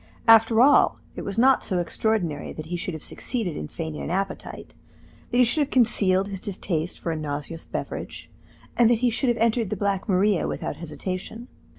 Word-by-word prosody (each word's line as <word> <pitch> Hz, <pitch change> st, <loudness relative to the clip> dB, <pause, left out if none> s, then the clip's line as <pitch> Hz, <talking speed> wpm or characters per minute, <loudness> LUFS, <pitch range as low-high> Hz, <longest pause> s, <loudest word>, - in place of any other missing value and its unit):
After 225 Hz, 0 st, +6 dB
all, 280 Hz, +3 st, +5 dB, 0.2 s
it -, -, -5 dB
was 200 Hz, -, -5 dB
not 260 Hz, +2 st, +4 dB
so 185 Hz, -, -1 dB
extraordinary 175 Hz, -2 st, -1 dB
that 155 Hz, -, -7 dB
he 175 Hz, +2 st, -4 dB
should 175 Hz, 0 st, -4 dB
have 155 Hz, -, -8 dB
succeeded 220 Hz, -, -3 dB
in 75 Hz, -, -5 dB
feigning 160 Hz, -, -6 dB
an -, -, -5 dB
appetite, 190 Hz, +2 st, -4 dB, 0.6 s
that 245 Hz, -, 0 dB
he 250 Hz, -, +7 dB
should 245 Hz, +6 st, +1 dB
have 285 Hz, -, 0 dB
concealed 195 Hz, -6 st, +3 dB
his 195 Hz, -2 st, -5 dB
distaste 180 Hz, -4 st, -3 dB
for 170 Hz, -, -3 dB
a -, -, -2 dB
nauseous 150 Hz, +2 st, -5 dB
beverage, -, -, -6 dB, 0.5 s
and 235 Hz, -2 st, +5 dB
that 240 Hz, -, +4 dB
he 240 Hz, -, +3 dB
should 250 Hz, +3 st, 0 dB
have 240 Hz, -, +1 dB
entered 230 Hz, -2 st, +1 dB
the 210 Hz, -, -3 dB
Black 200 Hz, 0 st, -1 dB
Maria 195 Hz, 0 st, +2 dB
without -, -, -4 dB
hesitation. 185 Hz, -, -6 dB
195 Hz, 195 wpm, -24 LUFS, 170-230 Hz, 0.6 s, he